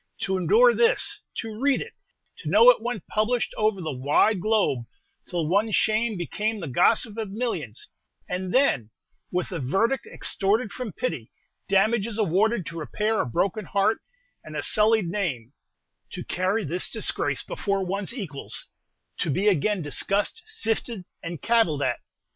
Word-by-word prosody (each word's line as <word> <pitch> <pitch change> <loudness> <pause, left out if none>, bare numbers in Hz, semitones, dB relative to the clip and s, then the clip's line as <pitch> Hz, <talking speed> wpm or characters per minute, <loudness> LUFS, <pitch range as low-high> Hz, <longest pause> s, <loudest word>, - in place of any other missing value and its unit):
To 190 - 0
endure 465 - +5
this 455 -3 +2 0.2
to 225 0 -5
read 280 0 +3
it 470 - -7 0.4
to 455 - -5
know - - +8
it - - -3
went 235 -4 -4
published 225 +3 0
over 215 -2 +1
the 160 -4 -3
wide 150 +10 +3
globe, 205 - +1 0.4
till 170 -3 -1
one's 205 +5 +2
shame 220 0 +1
became 215 +5 -2
the 170 - -5
gossip 215 - +2
of 215 -3 -3
millions 195 - -4 0.4
and 185 0 -3
then 185 - +3 0.4
with 180 +1 -2
a 180 - -3
verdict 195 - 0
extorted 205 +3 0
from 250 -2 -5
pity, 150 - -4 0.4
damages 215 +2 +2
awarded 210 0 +2
to 165 +1 -6
repair 210 +7 0
a - - -3
broken 195 - -1
heart 200 +4 +1 0.4
and 155 - -9
a 145 - -2
sullied 215 -1 +3
name 165 - -3 0.6
to - - -5
carry 190 +4 0
this 175 +5 -2
disgrace - - -2
before 195 -2 -2
one's 195 +3 -2
equals, 185 - -6 0.5
to - - 0
be 190 +9 +1
again 200 0 +2
discussed, 200 - 0
sifted, 230 - -2 0.2
and 165 -1 -6
cavilled 220 -12 +3
at! - - 0
205 Hz, 155 wpm, -25 LUFS, 175-225 Hz, 0.6 s, know